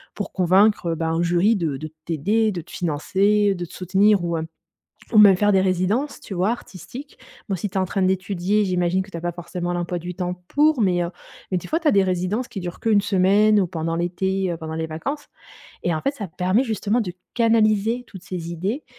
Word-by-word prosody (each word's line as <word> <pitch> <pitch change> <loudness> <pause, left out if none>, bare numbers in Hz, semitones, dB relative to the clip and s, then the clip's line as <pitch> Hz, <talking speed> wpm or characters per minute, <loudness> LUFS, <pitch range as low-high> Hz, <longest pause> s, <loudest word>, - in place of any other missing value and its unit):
pour 205 - -5
convaincre, 190 +1 +3
heu, - - -1
bah, 165 0 -2
un 165 +1 0
jury 175 +6 +3
de 160 -7 -2
de 155 +3 -7 0.2
t'aider, 205 +8 +1
de 175 -4 -4
te 165 - -17
financer, 195 +6 +1
heu, - - -6
de 175 - -4
te - - -15
soutenir 195 +1 +2
ou, 170 -1 -1
heu, 160 - -3 0.7
ou 215 - +5
même 200 -3 +8
faire 205 +1 +3
des 190 - +4
résidences, 190 +10 0
tu 195 - -8
vois, 185 +4 +1
artistiques. 240 - -8 0.3
Bon 195 - 0
si 205 +4 -3
tu - - -20
es - - +3
en 190 - +2
train 195 +1 -1
d'étudier 190 +2 +1
j'imagine 180 0 +1
que 195 - -13
tu - - -7
as - - -5
pas 175 +1 -2
forcément 175 +1 -4
l'emploi 175 0 -2
du 180 +1 -6
temps 180 0 -3
pour, 300 -3 +3
mais, 180 -3 +2
heu, 170 - -4 0.4
mais 185 - +2
des - - -10
fois 325 +2 0
tu 320 - +1
as - - +4
des 200 - +5
résidences 185 +6 -1
qui 195 - -6
durent 175 0 -6
qu'1 215 -3 +3
semaine 205 +2 +4
ou 185 - +1
pendant 165 -1 -3
l'été, 185 +2 -1
heu, 170 - -3
pendant 160 -1 -6
les 160 0 -2
vacances, 275 - -5 0.6
et 175 - +1
en 155 - -2
fait 275 - 0
ça 210 -8 -6
permet 185 +8 +1
justement 220 0 0
de 180 -6 -3 0.2
canaliser 225 0 +2
toutes 190 -4 -11
ces 175 -3 -5
idées 195 - -3
190 Hz, 235 wpm, -22 LUFS, 175-210 Hz, 0.7 s, même